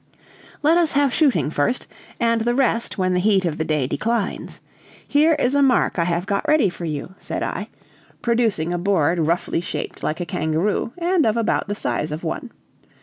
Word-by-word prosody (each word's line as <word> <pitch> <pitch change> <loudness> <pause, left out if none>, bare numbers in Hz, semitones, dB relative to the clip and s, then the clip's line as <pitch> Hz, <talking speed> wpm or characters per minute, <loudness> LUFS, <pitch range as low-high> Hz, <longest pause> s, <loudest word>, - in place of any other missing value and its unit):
"Let 325 +4 +5
us 330 -3 +2
have 280 -2 +2
shooting 275 - +2
first, 155 - 0 0.3
and 230 -1 +2
the 240 +2 +1
rest 245 -3 +1
when 185 -1 +1
the 180 - +2
heat 195 -1 +2
of 160 -2 -2
the - - +1
day 155 -4 0
declines. 220 - -2 0.5
Here 310 +2 +4
is 270 -3 +1
a 285 - +3
mark 255 -8 +2
I 170 - +2
have 175 +1 -1
got 200 0 -1
ready 300 -10 +4
for 175 0 -7
you," 155 +3 -4
said - - -4
I, - - -4 0.5
producing 225 -8 0
a 175 - -1
board 175 -3 +1
roughly 165 +1 0
shaped 180 - -5
like 155 - -2
a 175 - -2
kangaroo, 160 +8 -1
and 350 -1 +2
of 220 +1 +1
about 230 -2 0
the 205 - -2
size 155 -6 -2
of 155 +3 -5
one. 170 +9 -4
200 Hz, 195 wpm, -22 LUFS, 170-245 Hz, 0.5 s, Let